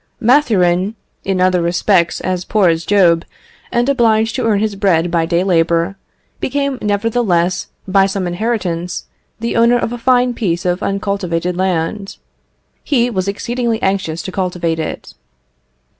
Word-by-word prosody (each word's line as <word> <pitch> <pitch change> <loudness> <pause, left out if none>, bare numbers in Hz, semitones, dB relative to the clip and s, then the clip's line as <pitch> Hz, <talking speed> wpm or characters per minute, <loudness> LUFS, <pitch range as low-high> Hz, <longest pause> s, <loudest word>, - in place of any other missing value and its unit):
Mathurin, 215 -7 +2 0.3
in 190 -1 -1
other 185 -1 +3
respects 170 0 +1
as 185 -1 -2
poor 200 -2 +2
as 165 0 -1
Job, 175 -5 +4 0.5
and 240 +1 +1
obliged 225 -5 +2
to 255 - -1
earn 215 -2 +2
his 210 0 -1
bread 175 -4 +1
by 165 -1 +1
day 170 +1 +1
labour, 170 0 +1 0.4
became 280 -1 -2
nevertheless, 205 -4 0 0.2
by 195 0 +4
some 195 -1 -2
inheritance, 180 -2 -2 0.3
the 230 +1 -2
owner 235 +1 +4
of 235 0 -2
a 240 - -6
fine 250 0 +2
piece 180 -8 -2
of 180 +2 0
uncultivated 195 -4 -2
land. 185 +2 -2 0.7
He 245 -4 +1
was 190 -3 -2
exceedingly 235 +3 -2
anxious 190 -4 -1
to 190 - -5
cultivate 180 -3 -2
it. 160 - -5
195 Hz, 145 wpm, -16 LUFS, 175-225 Hz, 0.7 s, Job